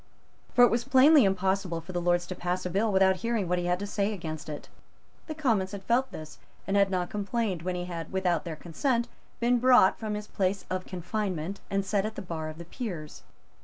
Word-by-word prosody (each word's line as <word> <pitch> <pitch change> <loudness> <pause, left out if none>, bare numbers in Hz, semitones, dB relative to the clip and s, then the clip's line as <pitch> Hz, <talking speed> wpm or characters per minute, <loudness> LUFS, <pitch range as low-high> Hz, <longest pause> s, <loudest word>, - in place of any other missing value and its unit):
For 245 - +7
it 245 - +6
was 235 +1 +1
plainly 270 +1 +6
impossible 190 -2 0
for 165 +3 -9
the 175 -1 -2
Lords 175 0 +2
to 185 - -5
pass 180 +1 -2
the 180 - -3
bill 210 +4 +1
without 190 -1 +4
hearing 230 -3 -1
what 180 +1 +1
he 175 - -2
had 180 0 +1
to 200 - -4
say 205 +1 -1
against 160 -5 -6
it. 150 - -7 0.6
The 310 - -5
Commons 220 -11 0
had 200 -1 -6
felt 245 +5 +1
this, 155 0 -9 0.3
and 195 - -1
had 200 -1 +4
not 180 -2 -2
complained 205 -3 -2
when 180 +1 -2
he 175 0 -3
had, 170 -2 -6
without 180 -4 +1
their 165 -2 -5
consent, 235 - -1 0.3
been 240 +1 +3
brought 250 -6 +5
from 215 -2 -3
his 210 0 -5
place 190 -2 -1
of 185 0 -3
confinement, 185 -1 -3
and 195 0 0
set 200 0 +1
at 220 - -7
the - - -5
bar 160 -3 -4
of 155 - -9
the 170 - -8
Peers. 175 - -6
190 Hz, 225 wpm, -28 LUFS, 175-220 Hz, 0.6 s, For